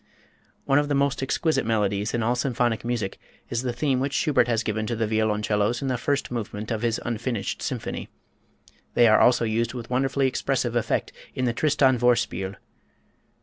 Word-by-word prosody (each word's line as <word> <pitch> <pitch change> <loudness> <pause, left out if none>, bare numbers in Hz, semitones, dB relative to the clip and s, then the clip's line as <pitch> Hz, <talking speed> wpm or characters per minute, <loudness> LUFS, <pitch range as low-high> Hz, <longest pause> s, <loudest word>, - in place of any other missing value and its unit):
One 140 0 +4
of 145 - 0
the 145 - 0
most 140 -1 +1
exquisite 155 +4 +1
melodies 105 -2 0
in 120 - 0
all 120 +2 +2
symphonic 120 -3 0
music 115 -5 -3 0.3
is 120 - 0
the 125 -1 -2
theme 130 +1 0
which 135 +2 -1
Schubert 145 -5 +3
has 115 -1 +1
given 110 0 -2
to 120 - -1
the 115 0 0
violoncellos 105 +1 +1
in 135 - -1
the 125 - 0
first 140 -1 -1
movement 110 -2 -4
of 110 -1 -1
his 115 -1 0
"Unfinished 120 -1 -3
Symphony." - - -4 0.9
They 120 - +6
also 120 +2 +5
are - - -1
used 115 +2 -1
with 120 -1 -7
wonderfully 135 +2 +1
expressive 130 -2 -1
effect 120 - 0 0.2
in 130 - 0
the 120 - +1
"Tristan 135 -2 +3
Vorspiel." 115 -6 +1
120 Hz, 180 wpm, -25 LUFS, 110-130 Hz, 0.9 s, They